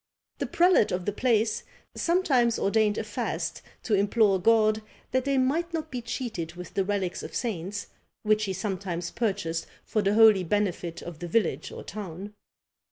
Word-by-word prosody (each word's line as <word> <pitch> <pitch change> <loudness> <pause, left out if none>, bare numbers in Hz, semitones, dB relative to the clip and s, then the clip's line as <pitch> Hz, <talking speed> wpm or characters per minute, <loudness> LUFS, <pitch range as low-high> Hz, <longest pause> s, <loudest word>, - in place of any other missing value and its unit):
The - - -1
prelate 350 - +4
of 180 0 -2
the 205 - 0
place 220 0 +1 0.3
sometimes 275 -10 +2
ordained 210 +1 +2
a - - -1
fast - - -3 0.2
to 220 - -1
implore 200 -1 +3
God 220 +1 +4 0.3
that 260 0 +1
they 275 -1 +1
might 325 +7 +1
not 315 -1 -4
be 250 -2 -3
cheated 225 -9 -4
with 180 0 -9
the 195 - +1
relics 190 -2 -2
of - - -8
saints, 200 -3 -3 0.4
which 215 0 +2
he 190 - -2
sometimes 185 -3 -3
purchased 180 -8 -2 0.2
for 215 - 0
the 200 +1 +1
holy 220 -4 +7
benefit 180 -3 -1
of 170 -2 -8
the 175 - -5
village 215 +5 0
or - - -8
town. 200 0 -7
210 Hz, 165 wpm, -27 LUFS, 185-235 Hz, 0.4 s, holy